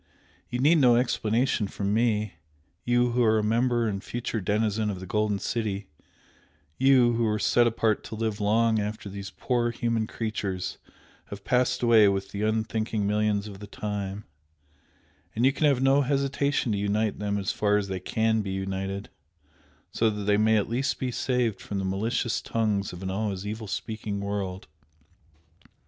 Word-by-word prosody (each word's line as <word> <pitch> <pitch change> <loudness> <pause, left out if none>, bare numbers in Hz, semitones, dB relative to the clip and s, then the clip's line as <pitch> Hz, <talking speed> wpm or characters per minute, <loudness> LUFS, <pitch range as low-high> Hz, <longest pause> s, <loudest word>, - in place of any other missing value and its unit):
You 120 - -2
need 150 +6 +4
no 125 -4 +6
explanation 120 -2 +1
from 100 +1 -2
me, 110 -2 +1 0.5
you 120 0 +2
who 120 +1 +2
are 110 -1 +4
a 105 - +1
member 120 +2 +2
and 100 -2 -3
future 120 -2 -3
denizen 105 +2 0
of 95 -3 -4
the 95 - -7
Golden 105 +2 0
City, 105 -2 -3 0.9
you, 130 -3 +5
who 115 0 +1
are 105 0 +1
set 120 +3 +3
apart 110 -2 +1
to - - -6
live 110 -1 -2
long 110 +2 +3
after 105 0 -4
these 100 0 -7
poor 120 +3 -1
human 115 -1 -1
creatures 95 -5 -3 0.5
have 100 -1 -9
passed 125 +1 +1
away 115 -3 +6
with 95 0 -1
the 100 - -4
unthinking 110 0 -1
millions 105 0 +1
of 100 -2 -9
the 105 - -9
time 100 -1 -5 1.1
and 115 +3 +2
you 135 - +4
can 150 - +2
have 135 -3 +2
no 135 +1 +5
hesitation 140 -1 0
to 100 - 0
unite 105 +1 0
them 105 0 -1
as 100 -1 -1
far 105 -1 +2
as 100 -1 -1
they 95 -1 -3
CAN 110 +4 +1
be 100 - -5
united, 95 +1 -3 0.8
so 115 - +2
that 105 -1 -4
they 105 0 +3
may 110 +1 +4
at 105 - 0
least 130 +5 -1
be 130 -1 -2
saved 125 -4 0
from 100 - -5
the 95 - -2
malicious 110 +5 -1
tongues 105 -3 -1
of 90 +1 -9
an 95 - -2
always 100 -1 -2
evil 110 +1 -5
speaking 105 0 -4
world. 100 -2 -4
110 Hz, 175 wpm, -27 LUFS, 100-120 Hz, 1.1 s, no